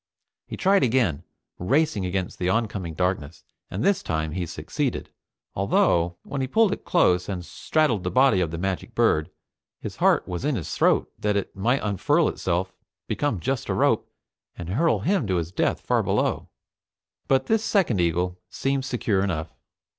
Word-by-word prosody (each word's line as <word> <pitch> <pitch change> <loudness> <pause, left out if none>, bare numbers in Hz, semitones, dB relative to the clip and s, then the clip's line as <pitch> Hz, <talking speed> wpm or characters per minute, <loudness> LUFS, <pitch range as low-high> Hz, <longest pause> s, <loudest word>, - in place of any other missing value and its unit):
He - - -6
tried 195 +1 +3
again, 115 - +1 0.3
racing 110 - +1
against 95 0 -3
the 90 - 0
oncoming 100 -6 -1
darkness, 90 -3 -2 0.3
and 100 +5 -3
this 200 - +2
time 80 -1 -2
he 90 +1 -3
succeeded, - - -3 0.4
although, 85 -3 +2
when 140 - -4
he 130 - -1
pulled 220 - +3
it - - -7
close 90 - +2
and 90 -3 -4
straddled 130 - 0
the 90 - -1
body 130 -4 +4
of 85 - 0
the 85 - -5
magic 95 +6 -3
bird, 110 -10 +2 0.5
his - - -7
heart - - +3
was 90 +5 -4
in 145 -1 +1
his 85 -9 -4
throat - - +2
that 105 -1 0
it 100 - -4
might 120 +8 +1
unfurl 100 -3 +2
itself, 95 +1 -2 0.3
become 145 -10 -1
just 130 +9 -2
a - - 0
rope, - - +2 0.5
and 85 -1 -6
hurl 160 - +2
him 185 - +1
to 95 - 0
his 85 -1 -2
death - - 0
far - - +1
below. - - -1 0.8
But 135 -1 +2
this 220 -1 +1
second 175 - +2
eagle 90 +2 0
seemed 135 -1 -1
secure 110 -6 0
enough. 80 -4 -3
95 Hz, 170 wpm, -25 LUFS, 90-130 Hz, 0.8 s, body